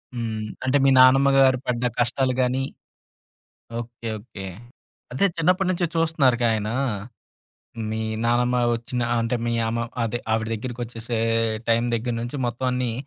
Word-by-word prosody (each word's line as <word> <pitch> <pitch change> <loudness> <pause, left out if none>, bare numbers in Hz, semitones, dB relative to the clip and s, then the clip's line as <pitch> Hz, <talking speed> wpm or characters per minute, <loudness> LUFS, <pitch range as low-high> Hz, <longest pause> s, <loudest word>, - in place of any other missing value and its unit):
హ్మ్. 110 -2 -3 0.2
అంటే 130 +2 +3
మీ 135 - +5
నానమ్మగారు 135 0 +6
పడ్డ 120 -1 -1 0.2
కష్టాలు 130 +2 +1
గాని 130 +1 +1 1.2
ఓకే. 120 0 -8
ఓకే. 100 -3 -9 0.7
అదే 165 +10 +3
చిన్నప్పడి 180 +3 +2
నుంచి 175 -1 0
చూస్తున్నారుగా 140 -7 +2
ఆయనా 110 +1 -2 1.2
మీ 110 0 -2 0.2
నానమ్మ 120 +1 +2 0.2
ఒచ్చిన 120 +1 -3 0.2
అంటే 115 +2 0
మీ 120 - 0 0.2
అమ 115 - -1 0.2
అదే 115 +1 -1
ఆవిడ 110 0 0
దగ్గరికొచ్చేసే 120 0 -4 0.5
టైం 115 +1 +3
దగ్గర 120 +1 -2
నుంచి 120 +5 -4
మొత్తం 120 +2 -2
అన్నీ 125 -2 -1
120 Hz, 130 wpm, -24 LUFS, 115-130 Hz, 1.2 s, నానమ్మగారు